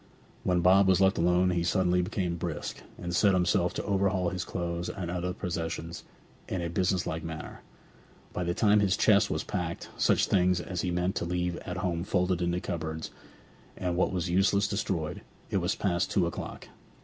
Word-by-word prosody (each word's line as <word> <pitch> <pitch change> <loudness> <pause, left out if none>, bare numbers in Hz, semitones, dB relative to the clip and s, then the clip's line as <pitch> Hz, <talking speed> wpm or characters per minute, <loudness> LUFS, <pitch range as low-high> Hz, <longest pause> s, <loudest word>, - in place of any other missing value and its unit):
When 90 -1 +2
Bob 95 +2 +6
was 95 -1 +4
left 95 -2 +3
alone 90 +2 +3
he 85 -1 0
suddenly 90 +1 +2
became 90 -1 -2
brisk, 85 -3 -4 0.2
and 85 0 -4
set 100 0 +4
himself 90 0 +2
to - - -2
overhaul 95 -2 +1
his 90 0 -3
clothes 85 -1 -3
and 85 -3 -4
other 90 0 -2
possessions 85 -2 -4 0.5
in 95 - -2
a 85 -1 -3
business 90 +1 +1
like 80 -1 -3
manner. 80 -1 -7 0.7
By 90 - -2
the 85 0 -1
time 105 -1 +4
that 100 - +3
his 95 -1 +1
chest 105 -1 +4
was 75 - -1
packed, 85 -4 -4
such - - +3
things 90 -1 +3
as 90 -2 -3
he 90 - -1
meant 90 +2 0
to - - -1
leave 90 0 -1
at 90 - -6
home 90 -3 -1
folded 90 -1 0
into 85 0 0
cupboards, 80 -2 -4 0.7
and 90 -1 -1
what 90 - +2
was 90 -3 -1
useless 95 +3 +3
destroyed, 95 -6 -2 0.3
it - - +2
was - - 0
past 90 -2 0
two 95 -4 +2
o'clock. 85 - -6
90 Hz, 190 wpm, -29 LUFS, 85-95 Hz, 0.7 s, Bob